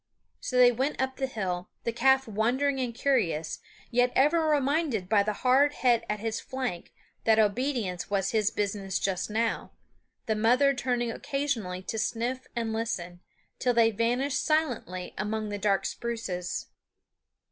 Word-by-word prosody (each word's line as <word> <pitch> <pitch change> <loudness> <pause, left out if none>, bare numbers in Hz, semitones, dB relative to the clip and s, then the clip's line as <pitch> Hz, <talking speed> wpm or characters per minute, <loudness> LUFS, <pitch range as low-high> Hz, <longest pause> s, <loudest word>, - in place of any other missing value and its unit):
So 255 - -3
they 250 -1 +8
went 265 +5 -1
up 265 0 -1
the 265 - -1
hill, 185 -7 -3
the 235 - -1
calf 265 +2 +3
wondering 250 +6 +1
and 250 -2 -1
curious, 205 - 0 0.3
yet 245 +1 +3
ever 315 +4 +3
reminded 285 - +1
by 205 +1 +4
the 210 +1 0
hard 275 +3 +5
head 240 -4 +2
at 210 0 -1
his 225 +1 -2
flank 255 -10 -4 0.3
that 220 -1 +5
obedience 215 -4 0
was 195 -1 0
his 215 -2 +2
business 200 -2 -2
just 190 0 -1
now, 225 +2 -1 0.5
the 220 - +1
mother 245 +6 +4
turning 245 -3 -1
occasionally 230 -10 -3
to 220 - -3
sniff 240 +4 -2
and 230 -2 -1
listen, 180 -6 -3 0.4
till 245 -1 +1
they 225 -1 +5
vanished 245 +5 0
silently 250 - -1
among 215 +1 -2
the 205 0 -4
dark 200 -1 +1
spruces. 220 -7 -3
230 Hz, 150 wpm, -28 LUFS, 205-260 Hz, 0.5 s, they